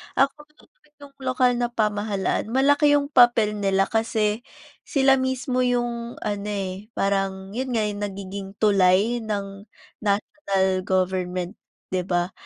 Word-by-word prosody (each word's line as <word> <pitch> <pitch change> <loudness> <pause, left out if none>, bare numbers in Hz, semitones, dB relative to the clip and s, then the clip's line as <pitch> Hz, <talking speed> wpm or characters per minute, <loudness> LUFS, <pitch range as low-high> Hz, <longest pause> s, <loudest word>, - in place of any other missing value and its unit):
Ako 275 +2 +3
rin 300 - -33
naman - - -33
'yong 280 -1 -13
lokal 255 -1 +2
na 240 - +1
pamahalaan 210 -3 -1
malaki 285 +3 +4
'yong 285 0 0
papel 240 -4 +5
nila 195 -1 +2
kasi 225 0 0 0.4
sila 270 -1 +4
mismo 260 0 -1
'yong 240 -1 -2
ano, 205 0 -3
eh, 195 0 -4
parang 195 -1 -1
'yon 260 +1 -2
nga, 220 - +2
yung 205 0 -5
nagiging 195 -1 -5
tulay 200 +3 +3
ng 200 -1 -5 0.3
national 200 -1 0 0.2
government, 185 0 -1 0.4
'di 185 -1 0
ba? 175 0 0
210 Hz, 135 wpm, -24 LUFS, 195-250 Hz, 0.4 s, papel